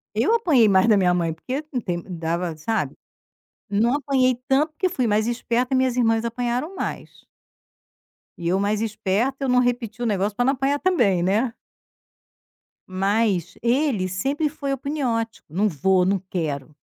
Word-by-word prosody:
Eu 450 - +2
apanhei 310 - +4
mais 190 +1 +4
da 215 -2 +5
minha 180 -2 +3
mãe 170 -2 0
porque 260 - -5
não 250 -4 -2
tem 175 -4 -3
dava 170 -1 -3
sabe, 220 +8 -2 0.7
não 220 +5 +2
apanhei 265 -3 +2
tanto, 290 +3 +2
porque 370 +4 0
eu - - -3
fui 255 -8 -1
mais 215 +1 +1
esperta, 240 +2 0
minhas 260 -1 +2
irmãs 225 -2 +2
apanharam 245 +8 -2
mais. - - -6 1.1
E 170 -1 -2
eu 185 +2 +2
mais 205 +1 0
esperta 220 +5 -1
eu - - -1
não 250 0 +4
repeti 245 -2 -1
o - - 0
negócio 205 -1 0
para 245 - +1
não 270 - +3
apanhar 275 +1 0
também, 235 - +2
né. 215 +7 +1 1.4
Mas 195 -1 0
ele 240 -5 +1
sempre 270 - -1
foi 285 -2 -4
apuniódico, 255 -5 -2
"não 190 +8 +1
vou, 185 +2 +2
não 195 +2 +2
quero". 155 -6 -4
225 Hz, 165 wpm, -23 LUFS, 190-260 Hz, 1.4 s, da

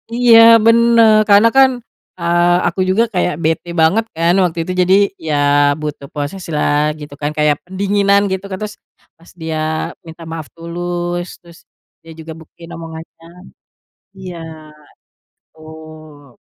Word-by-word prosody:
Iya, 240 -2 +5 0.3
benar, 230 -1 +5
karena 205 +3 +6
kan, 270 -1 +7 0.5
eee, 175 +1 +1 0.2
aku 170 - -4
juga 205 +5 +2
kayak 180 -2 0
bete 160 +2 -1
banget 195 +8 +2
kan 170 +2 +1
waktu 170 -2 -2
itu, 185 - -6
jadi, 180 +1 +2 0.3
ya, 155 - -1 0.5
butuh 150 -2 -6
proseslah, 150 -1 -2 0.2
gitu 145 -1 -10
kan, 145 - -2
kayak 150 -1 +2
pendinginan, 200 +1 +1
gitu 190 0 -3
kan? 190 - -4
Terus, 210 0 -7 0.4
pas 170 - -19
dia 160 -1 -4 0.5
minta 165 +1 -11
maaf 160 -2 -7
tulus, 175 +1 -5 0.2
terus 170 -1 -17 0.4
dia 165 - -14
juga 160 0 -9
buktiin 165 +1 -15
omongannya. 165 0 -11 0.9
Iya, 185 -2 -9 1.0
betul. 155 -3 -15
170 Hz, 130 wpm, -16 LUFS, 160-190 Hz, 1.0 s, kan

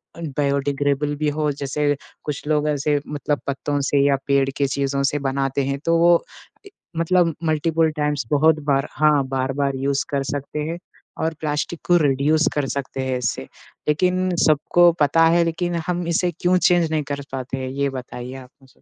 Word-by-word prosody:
अ, 170 - -10 0.2
biodegradable 145 +1 0
भी 150 0 0
हो, 150 0 0
जैसे 145 +1 -1 0.3
कुछ 150 -1 -5
लोग 150 0 +1
ऐसे 145 0 +1
मतलब 145 0 -2
पत्तों 140 +1 -1
से 140 - +2
या 140 -1 +4
पेड़ 140 -1 +3
की 140 - +2
चीज़ों 140 0 -1
से 145 - -2
बनाते 135 0 -1
हैं, 140 0 -2
तो 165 0 +3
वो 170 0 +5 0.4
ए, - - -12 0.3
मतलब 165 -1 +2
मल्टीपल 160 +1 +2
टाइम्स 150 -3 -1
बहुत 155 +2 +4
बार 140 0 +2
हाँ, 150 -2 +3
बार-बार 135 +1 -1
यूज 135 +1 0
कर 140 -1 -1
सकते 145 +1 -4
हैं 170 - -3 0.5
और 160 - 0
प्लास्टिक 150 +2 -2
को 175 - +5
रीड्यूस 145 +3 +2
कर 145 -2 0
सकते 135 -1 -4
हैं 130 -1 0
इससे, 120 -3 -3 0.4
लेकिन 185 +4 +1 0.2
सबको 170 +3 +4
पता 165 +3 +4
है 170 +1 +4
लेकिन 175 +1 -2
हम 175 -1 -1
इसे 175 +1 +1
क्यों 180 +1 +3
चेंज 175 -1 +3
नहीं 155 -1 0
कर 140 - -4
पाते 130 0 -4
हैं? 130 0 -4
ये 140 +1 -1
बताइए 125 -1 -7
आप 130 -1 -10
मुझे। 135 - -20
145 Hz, 180 wpm, -22 LUFS, 140-160 Hz, 0.5 s, वो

